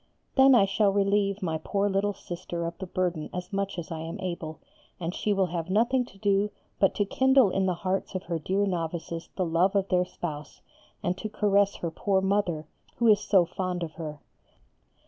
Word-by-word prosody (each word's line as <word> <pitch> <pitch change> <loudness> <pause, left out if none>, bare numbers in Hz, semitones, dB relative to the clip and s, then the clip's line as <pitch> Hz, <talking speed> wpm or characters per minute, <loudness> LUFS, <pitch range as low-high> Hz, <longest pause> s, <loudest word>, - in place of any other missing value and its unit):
Then 270 -1 +7
I 205 -5 +6
shall 200 +1 +2
relieve 200 0 +1
my 160 -3 -1
poor 200 0 +1
little 200 +1 0
Sister 175 -1 -5
of 170 0 -4
the 190 - -5
burden 180 -3 -1
as 180 +1 -6
much 200 0 -2
as 170 -1 -6
I 160 - -4
am 165 +1 -6
able, 170 -4 -5 0.4
and 170 0 -3
she 210 - -1
will 195 -2 +3
have 170 -1 -4
nothing 240 +6 +2
to 195 - -17
do 200 0 +2 0.3
but 195 - +3
to 205 - +1
kindle 265 -1 +4
in 190 0 +1
the 180 - +1
hearts 185 +2 -2
of 185 - -2
her 170 -1 -3
dear 190 +6 0
novices 170 -2 -3
the 185 - 0
love 175 +4 +2
of 195 -1 +1
their 180 -1 +3
Spouse, 150 -5 -7 0.4
and 180 - 0
to 215 - -4
caress 200 -1 +2
her 170 - -4
poor 195 +3 +1
mother, 190 -5 0 0.3
who 235 - 0
is 210 -2 +6
so 190 -4 +4
fond 180 0 -3
of 160 - -4
her. 155 -2 -6
190 Hz, 205 wpm, -27 LUFS, 170-200 Hz, 0.4 s, Then